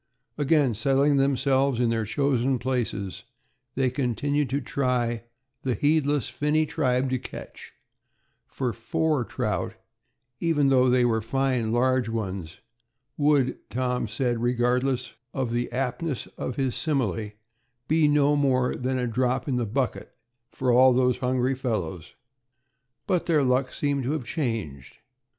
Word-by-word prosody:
Again 145 Hz, -3 st, +2 dB
settling 140 Hz, +5 st, +2 dB
themselves 135 Hz, -1 st, +2 dB
in 120 Hz, -2 st, +2 dB
their 115 Hz, -1 st, 0 dB
chosen 135 Hz, +1 st, +1 dB
places, 115 Hz, -6 st, -3 dB, 0.5 s
they 130 Hz, -1 st, +1 dB
continued 140 Hz, +2 st, 0 dB
to 140 Hz, +2 st, 0 dB
try 120 Hz, -4 st, -1 dB, 0.4 s
"the 130 Hz, -3 st, -1 dB
heedless 145 Hz, 0 st, +1 dB
finny 150 Hz, +5 st, +1 dB
tribe 130 Hz, -4 st, 0 dB
to 130 Hz, -, 0 dB
catch"; -, -, -10 dB, 0.7 s
for 125 Hz, -3 st, -3 dB
four 150 Hz, +5 st, 0 dB
trout, -, -, -3 dB, 0.6 s
even 150 Hz, -5 st, +2 dB
though 130 Hz, -1 st, +4 dB
they 125 Hz, 0 st, +4 dB
were 110 Hz, -2 st, +1 dB
fine, 125 Hz, -1 st, 0 dB
large 125 Hz, 0 st, +2 dB
ones, 95 Hz, -5 st, -4 dB, 0.5 s
would, 145 Hz, -3 st, +2 dB
Tom 125 Hz, -1 st, -1 dB
said, 120 Hz, +2 st, -1 dB
regardless 125 Hz, +1 st, 0 dB, 0.2 s
of 130 Hz, -3 st, -1 dB
the 120 Hz, 0 st, -1 dB
aptness 130 Hz, +3 st, -2 dB
of 125 Hz, -, -4 dB
his 130 Hz, -2 st, 0 dB
simile, 115 Hz, -, -1 dB, 0.5 s
be 155 Hz, 0 st, +3 dB
no 145 Hz, 0 st, +3 dB
more 130 Hz, -3 st, +2 dB
than 130 Hz, +1 st, -2 dB
"a 125 Hz, -, 0 dB
drop 125 Hz, +3 st, 0 dB
in 130 Hz, -3 st, 0 dB
the 120 Hz, -2 st, -1 dB
bucket 125 Hz, +4 st, -2 dB, 0.3 s
for 130 Hz, -1 st, 0 dB
all 130 Hz, +1 st, +6 dB
those 125 Hz, 0 st, +2 dB
hungry 130 Hz, 0 st, +1 dB
fellows"; 95 Hz, -, -4 dB, 0.9 s
but 180 Hz, -3 st, 0 dB
their 155 Hz, -4 st, +3 dB
luck 130 Hz, 0 st, +1 dB
seemed 140 Hz, -3 st, -1 dB
to 140 Hz, -, 0 dB
have 155 Hz, -5 st, -2 dB
changed. 110 Hz, -, -4 dB
130 Hz, 135 wpm, -26 LUFS, 120-140 Hz, 0.9 s, all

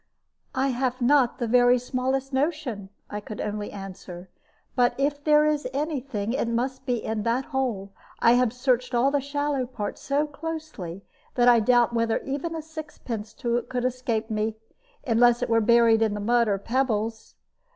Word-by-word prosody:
"I 265 Hz, +1 st, +1 dB
have 255 Hz, 0 st, -1 dB
not 255 Hz, 0 st, +3 dB
the 245 Hz, -, -2 dB
very 245 Hz, +1 st, +5 dB
smallest 260 Hz, +2 st, -2 dB
notion," 265 Hz, -, -2 dB, 0.2 s
I 210 Hz, -, -5 dB
could 210 Hz, 0 st, -9 dB
only 210 Hz, 0 st, -3 dB
answer; 185 Hz, -2 st, -9 dB, 0.5 s
"but 245 Hz, -2 st, +3 dB
if 285 Hz, +1 st, -1 dB
there 300 Hz, 0 st, +5 dB
is 300 Hz, -3 st, 0 dB
any 295 Hz, +1 st, -1 dB
thing, 230 Hz, -4 st, -3 dB
it 260 Hz, -, 0 dB
must 250 Hz, +3 st, -2 dB
be 245 Hz, -3 st, 0 dB
in 220 Hz, -1 st, -2 dB
that 235 Hz, +4 st, 0 dB
hole. 235 Hz, -8 st, -2 dB, 0.3 s
I 230 Hz, -, +5 dB
have 245 Hz, -1 st, +3 dB
searched 250 Hz, 0 st, 0 dB
all 255 Hz, +4 st, +3 dB
the 285 Hz, -1 st, +1 dB
shallow 285 Hz, -2 st, -1 dB
part 210 Hz, -5 st, -5 dB
so 285 Hz, +2 st, 0 dB
closely 300 Hz, -, -6 dB, 0.3 s
that 245 Hz, -1 st, +3 dB
I 240 Hz, -1 st, +7 dB
doubt 240 Hz, +1 st, +3 dB
whether 230 Hz, -1 st, +1 dB
even 285 Hz, +5 st, -3 dB
a 320 Hz, -, -5 dB
sixpence 300 Hz, -9 st, -7 dB
could 240 Hz, +1 st, -2 dB
escape 240 Hz, -3 st, -2 dB
me, 215 Hz, 0 st, -1 dB, 0.5 s
unless 240 Hz, 0 st, +4 dB
it -, -, -2 dB
were 230 Hz, 0 st, +3 dB
buried 230 Hz, 0 st, +5 dB
in 220 Hz, -2 st, +2 dB
the -, -, -4 dB
mud 235 Hz, +2 st, +2 dB
or 200 Hz, -2 st, +1 dB
pebbles. 225 Hz, -1 st, -2 dB
245 Hz, 170 wpm, -25 LUFS, 225-270 Hz, 0.5 s, I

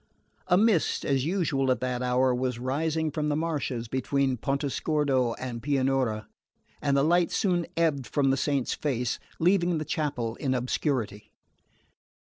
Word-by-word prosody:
A 180 Hz, -, +4 dB
mist, 210 Hz, -5 st, +2 dB
as 135 Hz, -1 st, +1 dB
usual 155 Hz, -7 st, 0 dB
at 130 Hz, -, +2 dB
that 125 Hz, -1 st, -2 dB
hour, 125 Hz, +1 st, +2 dB
was 125 Hz, -1 st, -1 dB
rising 155 Hz, +5 st, -1 dB
from 150 Hz, +1 st, -1 dB
the 145 Hz, -, +1 dB
marshes 145 Hz, -7 st, -2 dB
between 130 Hz, +2 st, 0 dB
Pontesordo 135 Hz, -1 st, 0 dB
and 120 Hz, -2 st, -5 dB
Pianura, 130 Hz, -5 st, 0 dB, 0.5 s
and 140 Hz, -1 st, +2 dB
the 140 Hz, -, +3 dB
light 175 Hz, +2 st, +3 dB
soon 175 Hz, -4 st, +1 dB
ebbed 150 Hz, -6 st, +1 dB
from 140 Hz, -2 st, +2 dB
the -, -, +3 dB
saint's 140 Hz, -2 st, 0 dB
face, 125 Hz, -5 st, -2 dB, 0.2 s
leaving 175 Hz, 0 st, +2 dB
the 155 Hz, -, -3 dB
chapel 145 Hz, -, -2 dB
in 130 Hz, -2 st, -1 dB
obscurity. 125 Hz, -4 st, -2 dB
140 Hz, 145 wpm, -27 LUFS, 125-155 Hz, 0.5 s, A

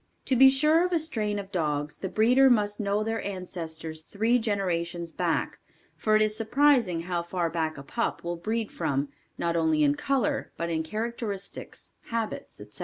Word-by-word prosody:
To 265 Hz, -, +2 dB
be 265 Hz, +2 st, +8 dB
sure 305 Hz, +5 st, +4 dB
of 360 Hz, -, 0 dB
a -, -, +4 dB
strain 220 Hz, -10 st, -1 dB
of 200 Hz, -1 st, -6 dB
dogs 150 Hz, -4 st, -2 dB
the 190 Hz, -, -3 dB
breeder 250 Hz, +7 st, +5 dB
must 205 Hz, -4 st, +2 dB
know 205 Hz, 0 st, 0 dB
their 225 Hz, +1 st, -2 dB
ancestors 165 Hz, -5 st, -5 dB
three 225 Hz, +8 st, +1 dB
generations 175 Hz, -6 st, -1 dB
back -, -, -1 dB, 0.3 s
for 215 Hz, -1 st, +1 dB
it 215 Hz, -, +5 dB
is 215 Hz, 0 st, 0 dB
surprising 230 Hz, -, +3 dB
how 175 Hz, 0 st, -2 dB
far 170 Hz, -1 st, -2 dB
back 160 Hz, -2 st, -2 dB
a 140 Hz, -, -8 dB
pup 230 Hz, +11 st, -2 dB
will 170 Hz, 0 st, -2 dB
breed 220 Hz, +5 st, -2 dB
from, 140 Hz, -4 st, -1 dB, 0.3 s
not 170 Hz, 0 st, -1 dB
only 160 Hz, -2 st, +2 dB
in 145 Hz, -1 st, +4 dB
color 265 Hz, -, -1 dB
but 170 Hz, 0 st, -2 dB
in 160 Hz, -1 st, 0 dB
characteristics, 215 Hz, +2 st, -5 dB
habits, 230 Hz, -2 st, -4 dB
etc. -, -, -10 dB
200 Hz, 180 wpm, -27 LUFS, 170-230 Hz, 0.3 s, be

